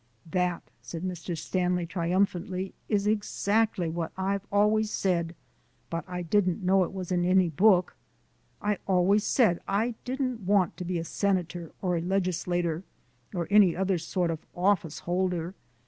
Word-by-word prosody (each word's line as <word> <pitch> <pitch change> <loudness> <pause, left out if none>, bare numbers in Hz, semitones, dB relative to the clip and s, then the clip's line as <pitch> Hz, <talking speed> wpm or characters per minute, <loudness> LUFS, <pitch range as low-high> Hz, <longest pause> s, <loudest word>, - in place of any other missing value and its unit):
"That," 180 -1 0 0.2
said 165 0 -7
Mr. 180 -2 -4
Stanley, 180 +1 -1 1.0
"is 205 -2 +1
exactly 210 -2 +1
what 165 0 -3
I've 195 +1 0
always 210 +1 +3
said, 170 -5 0 0.6
but 165 0 -2
I 180 -1 -4
didn't 185 +1 +1
know 190 +1 +4
it - - -4
was 185 -2 -6
in 175 -1 +2
any 185 0 +4
book. 180 +2 +3 0.7
I 205 -1 0
always 195 +2 +3
said 215 -10 +3
I 220 +5 +1
didn't 255 -2 -2
want 195 -2 +2
to 180 - -5
be 180 0 -1
a 165 - -2
senator 175 -2 -1
or 180 -2 +1
a - - -1
legislator, 175 -2 -1 0.5
or 170 -2 -2
any 205 -4 +6
other 190 -1 0
sort 170 +1 -1
of 160 - -4 0.2
office 175 -4 +1
holder. 180 -1 -1
185 Hz, 145 wpm, -28 LUFS, 175-200 Hz, 1.0 s, any